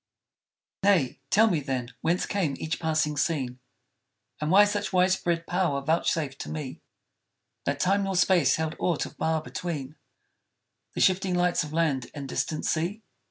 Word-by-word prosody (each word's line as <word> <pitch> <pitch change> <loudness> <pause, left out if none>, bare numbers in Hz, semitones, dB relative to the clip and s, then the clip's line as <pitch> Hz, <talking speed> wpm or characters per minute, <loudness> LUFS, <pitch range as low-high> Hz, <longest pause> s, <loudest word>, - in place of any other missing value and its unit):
Nay, 185 -10 +2
tell 220 +3 +5
me, 175 -7 +1
then, 130 -4 -3
whence 170 +3 +1
came 170 -9 -1
each 160 - -3
passing 155 -2 0
scene, 130 -6 -1 0.8
And 150 - -2
why 200 +4 +7
such 205 -1 -2
widespread 180 -2 +2
power 175 -6 0
vouchsafed 150 -1 0
to - - -6
me, 150 -4 -6 0.8
That - - -1
time 195 +2 +2
nor 195 -1 -2
space 175 -7 +4
held 160 0 -2
aught 175 -4 0
of - - -11
bar 160 -1 0
between 155 -5 -5 1.0
The - - -1
shifting 185 -1 +3
lights 180 -2 +2
of 150 - -7
land 155 -6 0
and 140 -2 -5
distant 155 +3 -2
sea? 180 +7 -1
165 Hz, 155 wpm, -27 LUFS, 150-185 Hz, 1.0 s, why